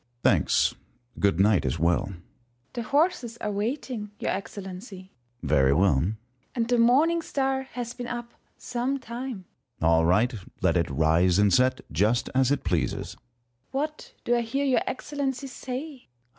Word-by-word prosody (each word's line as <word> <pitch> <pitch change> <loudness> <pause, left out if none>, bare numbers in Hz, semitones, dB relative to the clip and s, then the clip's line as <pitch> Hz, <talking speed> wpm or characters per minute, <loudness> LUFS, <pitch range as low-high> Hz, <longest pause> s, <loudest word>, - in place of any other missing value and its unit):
Sun. 120 0 -44
Thanks; - - +2 0.4
good 100 -4 +2
night 100 -1 +4
as 65 +2 -1
well. 85 +5 +2
First 100 - -8
Hour. 85 - -17 0.5
The 240 - -3
horses 260 -2 +1
are 210 - -3
waiting, 220 +1 -3
your - - -1
Excellency. 190 0 -7 0.3
Sun. - - -5
Very 70 -2 +4
well. 95 +1 +4
First 80 - 0
Hour. 110 +2 -4 0.4
And 230 -2 0
the 245 - +3
Morning 295 +9 +4
Star 270 -3 -1
has 240 -1 -4
been 245 -1 -6
up 240 -1 -5 0.2
some 250 +3 -2
time. 240 -5 -6 0.3
Sun. 80 - +1
All 80 0 +4
right. 105 +9 +3 0.3
Let 85 - +3
it 85 -2 +1
rise 80 +5 +3
and 100 -2 +4
set, 130 +4 +3
just 110 +9 +1
as 130 -1 +3
it 145 - 0
pleases. 85 -9 -1
First - - -11
Hour. 120 0 -37
What 300 +3 -4
do 240 - +3
I 240 - +2
hear 270 +5 -1
your 265 -2 +3
Excellency 275 -1 -3
say 265 +2 -7
200 Hz, 180 wpm, -26 LUFS, -, 0.5 s, night